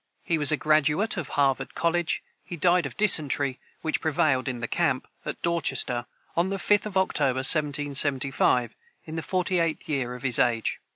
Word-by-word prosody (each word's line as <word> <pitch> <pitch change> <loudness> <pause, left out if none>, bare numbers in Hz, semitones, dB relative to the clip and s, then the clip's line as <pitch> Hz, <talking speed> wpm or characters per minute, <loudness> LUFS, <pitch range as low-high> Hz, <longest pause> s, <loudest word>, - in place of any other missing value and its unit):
He 165 -2 -1
was 150 0 +6
a 155 - +1
graduate 155 +8 +1
of 165 -6 -5
Harvard 135 -2 0
college. 170 0 -1 0.2
He 175 - -8
died 175 +2 +2
of - - -13
dysentery, 145 -9 +3 0.2
which 160 - -2
prevailed 155 -5 0
in 125 -2 -4
the 115 - -4
camp, 160 -5 -1 0.2
at - - -5
Dorchester, 135 -7 0 0.3
on 170 +3 0
the 195 - -3
5th 205 +2 +1
of 195 -2 -4
October, 135 -8 +1
1775, 140 -5 +2 0.3
in 160 - -8
the 160 - -3
forty 180 +1 -1
eighth 165 -2 -2
year 130 -5 -3
of 125 - -11
his 125 -4 +3
age. 115 -2 0
150 Hz, 175 wpm, -25 LUFS, 135-170 Hz, 0.3 s, was